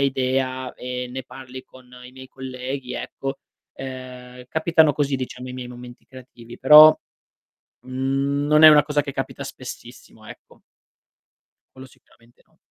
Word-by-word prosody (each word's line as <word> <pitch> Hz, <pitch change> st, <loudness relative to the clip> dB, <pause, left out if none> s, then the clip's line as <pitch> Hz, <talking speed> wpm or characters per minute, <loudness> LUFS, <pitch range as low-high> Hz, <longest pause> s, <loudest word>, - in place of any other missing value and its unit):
idea, 130 Hz, -1 st, -1 dB
e 125 Hz, 0 st, -6 dB
ne 130 Hz, +1 st, -6 dB
parli 130 Hz, 0 st, -11 dB
con 130 Hz, -1 st, -19 dB, 0.2 s
i 125 Hz, -, -13 dB
miei 130 Hz, 0 st, -13 dB
colleghi 130 Hz, 0 st, -7 dB
ecco, 135 Hz, 0 st, -6 dB, 0.4 s
ehm, 125 Hz, -1 st, -9 dB
capitano 160 Hz, -1 st, +2 dB
così 140 Hz, -1 st, -1 dB
diciamo 125 Hz, 0 st, -7 dB
i -, -, -7 dB
miei 125 Hz, -1 st, -7 dB
momenti 125 Hz, 0 st, -12 dB
creativi, 120 Hz, -2 st, -14 dB
però, 150 Hz, +3 st, +9 dB, 0.9 s
mhmm, 135 Hz, +2 st, -2 dB
non 150 Hz, +1 st, +4 dB
è 155 Hz, -, +11 dB
una 150 Hz, -1 st, +7 dB
cosa 150 Hz, -1 st, 0 dB
che 140 Hz, -1 st, -7 dB
capita -, -, -5 dB
spessissimo, -, -, -11 dB
ecco. -, -, -15 dB, 1.1 s
Quello 130 Hz, 0 st, -12 dB
sicuramente 120 Hz, -1 st, -26 dB
no. -, -, -36 dB
130 Hz, 140 wpm, -22 LUFS, 125-140 Hz, 1.1 s, è